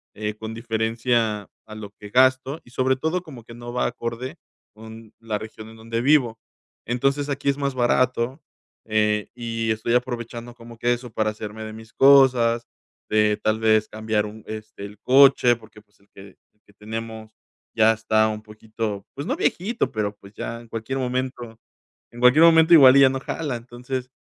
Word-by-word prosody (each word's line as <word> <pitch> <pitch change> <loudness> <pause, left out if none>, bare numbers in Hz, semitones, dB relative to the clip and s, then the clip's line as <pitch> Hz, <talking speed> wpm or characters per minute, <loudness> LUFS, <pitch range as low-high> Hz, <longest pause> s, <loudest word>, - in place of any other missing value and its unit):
eh, 105 0 -4
con 110 +1 -7
diferencia 115 -1 -1 0.2
a 110 - -10
lo 105 -2 -9
que 105 0 -13
gasto 130 +4 +2
y 120 - -19
sobre 130 +1 +1
todo, 160 +7 -2
como 130 -9 -12
que 115 - -13
no 120 0 -9
va 125 - 0
acorde 115 +2 -5 0.4
con 110 0 -13
la 115 -2 -3
región 110 0 -10
en 110 - -14
donde 115 +1 -4
vivo. 125 -5 +2 0.5
Entonces 135 +4 0
aquí 140 0 -1
es 140 - 0
más 140 -2 -2
barato, 125 +2 +1 0.4
eh, 105 -1 0
y 115 -2 -3
estoy 110 +2 -1
aprovechando 120 -1 -3
como 115 -1 -13
que 120 +1 +1
eso 120 -1 -7
para 110 0 0
hacerme 105 0 -8
de 110 0 -7
mis 110 0 -13
cosas, 125 -4 +5 0.4
de 105 -1 +2
tal 110 0 +1
vez 110 -1 +3
cambiar 110 -1 -1
un 105 +1 -11
este 110 -2 -8
el 105 +1 -11
coche 130 -2 +5
porque 110 -2 -17
pues 105 -1 -35
el 100 - -30
que - - -15 0.3
el 105 - -43
que 105 - -23
tenemos 110 +1 -8 0.4
ya 110 0 +5
está 110 0 +1
un 105 0 -5
poquito, 110 -1 -6
pues 140 - -6
no - - 0
viejito, 195 - -1
pero 105 -3 -3
pues 100 +1 -16
ya 115 +1 -6
en 120 - -16
cualquier 115 +4 -4
momento 125 -2 -4 0.5
en 120 - -12
cualquier 125 +6 +6
momento 165 0 +6
igual 135 -4 +8
ya 135 - +7
no 135 0 -3
jala, 140 -2 -4
entonces, 125 +2 -6
115 Hz, 185 wpm, -23 LUFS, 110-130 Hz, 0.5 s, igual